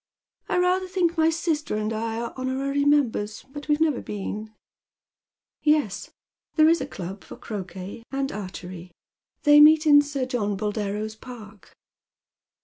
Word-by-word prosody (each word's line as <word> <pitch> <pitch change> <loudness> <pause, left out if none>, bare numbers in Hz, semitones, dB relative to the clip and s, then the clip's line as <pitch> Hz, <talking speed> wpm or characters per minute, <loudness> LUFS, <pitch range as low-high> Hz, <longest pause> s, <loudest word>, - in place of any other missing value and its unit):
" - - -41
I - - +1
rather 365 +1 +2
think 360 -2 0
my 320 -1 +4
sister 320 -6 -1
and 215 +1 -2
I 225 +1 -3
are 235 0 -4
Jionorary 270 +2 -1
members, 235 -8 +1
but 290 0 -8
we've 295 0 +2
never 310 -5 +1
been." 210 +1 -5
_ - - -27 0.6
" - - -69
Yes, 300 -9 +1 0.5
thele 310 0 +7
is 335 - +2
a - - -3
club 190 -5 -7
for - - -10
croquet 190 0 -7
and 275 0 -2
archery. 185 -3 -7 0.5
They 295 -1 +7
meet 310 +1 +7
in 290 -1 +8
Sir 285 -2 -3
John 210 -6 -2
Boldero's 210 +1 -3
park." 220 -4 -12
255 Hz, 155 wpm, -25 LUFS, 210-300 Hz, 0.6 s, in